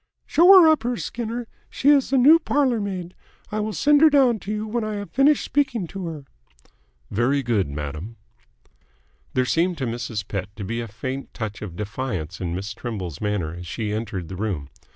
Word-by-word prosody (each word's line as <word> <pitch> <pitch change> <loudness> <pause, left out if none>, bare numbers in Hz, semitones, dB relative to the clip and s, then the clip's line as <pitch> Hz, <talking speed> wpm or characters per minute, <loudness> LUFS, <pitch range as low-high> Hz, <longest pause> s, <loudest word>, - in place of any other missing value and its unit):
"Show 335 +4 +4
her 335 - +7
up 315 -4 +4
here, 240 +1 -2
Skinner. 235 0 -4 0.2
She 280 - +1
is 285 -3 +5
the 270 - +2
new 295 +6 +7
parlour 270 -7 +1
maid. 185 -3 -4 0.4
I 215 - -1
will 215 +1 -2
send 290 +6 +3
her 315 - +8
down 260 -6 +4
to 195 - -6
you 215 0 -2
when 230 +1 -2
I 215 -1 -3
have 205 -1 -6
finished 285 +2 +3
speaking 265 -8 0
to 195 -3 -5
her." 155 -4 -7 0.9
"Very 130 +6 +1
good, 110 - 0
madam." 75 +9 -6 1.2
There 130 0 +2
seemed 170 +6 +1
to 135 - -2
Mrs. 115 -3 -4
Pett 100 -2 -4
to 105 - -6
be 115 +4 -3
a 115 - -5
faint 130 +6 -6
touch 105 -4 -5
of 95 -6 -7
defiance 105 -6 -4
in 85 -1 -2
Miss 100 +2 -4
Trimble's 95 - -6
manner 105 -7 -1
as 90 0 -8
she 105 +4 -3
entered 105 -5 -4
the 95 - -7
room. 90 -9 -3
130 Hz, 195 wpm, -23 LUFS, -, 1.2 s, her